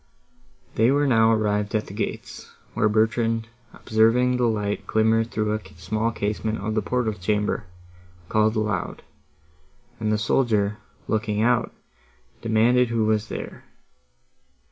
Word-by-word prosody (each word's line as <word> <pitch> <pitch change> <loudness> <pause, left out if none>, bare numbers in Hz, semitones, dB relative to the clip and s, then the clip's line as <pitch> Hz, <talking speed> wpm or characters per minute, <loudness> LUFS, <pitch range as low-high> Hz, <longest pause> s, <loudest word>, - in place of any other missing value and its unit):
They 115 +2 +3
were 145 +2 +3
now 115 -4 +4
arrived 105 -1 0
at 110 - 0
the - - -10
gates, - - -5 0.2
where 105 - +2
Bertrand, 115 +1 +1 0.2
observing 120 +3 +2
the 125 -1 +2
light 105 -2 -2
glimmer 110 +1 +3
through 110 -2 -2
a 110 - -1 0.2
small 110 +6 -1
casement 110 0 -2
of 105 +3 -3
the 110 - +1
portal 125 -3 -1
chamber, 105 +1 -1 0.6
called 110 +3 +2
aloud; 105 -1 -2 1.0
and 110 -1 -1
the 110 - +2
soldier, 105 -2 +1 0.3
looking 110 -1 0
out, 120 0 +2 0.7
demanded 120 +2 +3
who 115 -2 +1
was 110 -1 +1
there. - - -7
110 Hz, 130 wpm, -24 LUFS, 105-115 Hz, 1.0 s, now